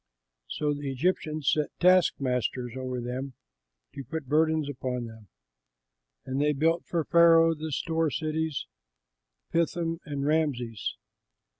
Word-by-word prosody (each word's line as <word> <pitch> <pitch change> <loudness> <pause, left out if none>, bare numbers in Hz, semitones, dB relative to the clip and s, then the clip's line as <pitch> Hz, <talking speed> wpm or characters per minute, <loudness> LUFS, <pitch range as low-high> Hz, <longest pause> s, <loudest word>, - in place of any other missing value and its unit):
So 150 -1 -1
the 145 -1 -4
Egyptians 155 0 0
set 150 -1 +1
taskmasters 130 -9 +2
over 130 -1 -3
them 125 +2 -5 0.6
to 140 -1 -7
put 155 +4 -5
burdens 155 +2 +2
upon 125 -3 -3
them. 110 -2 -12 1.0
And 130 +2 -2
they 150 0 +3
built 165 +4 +1
for 165 -3 -1
Pharaoh 165 -1 +6
the 160 0 -6
store 160 +2 0
cities, 155 0 -2 0.9
Pithom 165 0 0
and 140 -2 -4
Rameses. 140 -8 -1
150 Hz, 120 wpm, -28 LUFS, 130-160 Hz, 1.0 s, Pharaoh